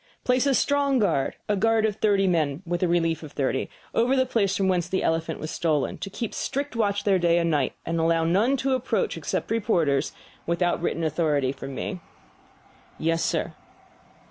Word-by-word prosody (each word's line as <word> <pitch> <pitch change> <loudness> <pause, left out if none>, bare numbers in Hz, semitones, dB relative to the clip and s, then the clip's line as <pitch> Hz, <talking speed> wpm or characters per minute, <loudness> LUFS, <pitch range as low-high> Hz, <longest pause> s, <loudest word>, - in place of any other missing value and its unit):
"Place 255 +2 +2
a 275 - +3
strong 280 -1 +2
guard 200 - +1
A 210 - +1
guard 225 +2 +2
of 210 -1 -1
thirty 205 -3 +2
picked 190 - +3
men, 155 -1 0
with 175 +1 -2
a 180 - +3
relief 165 -2 +1
of 155 -3 -10
thirty 135 -1 -1 0.2
over 245 +4 +2
the 260 -1 +3
place 205 -6 +1
from 195 - +1
whence 180 -2 0
the 190 - 0
elephant 165 0 -1
was 155 - -5
stolen, 155 -4 -1
to 195 - -5
keep 225 +2 -5
strict 280 -1 -3
watch 205 -3 0
there 195 -2 +3
night 170 -1 +3
and 170 -1 +1
day, 145 -3 +1
and 165 0 -1
allow 165 0 +2
none 205 +11 +2
to 270 0 0
approach 260 - 0
except - - -3
reporters 175 -11 +1 0.4
without 170 0 0
written 165 -1 -1
authority 150 -4 +1
from 135 0 -8
me." 185 +7 -4 1.0
"Yes, 165 +1 0
sir." - - -1
180 Hz, 195 wpm, -25 LUFS, 165-225 Hz, 1.0 s, a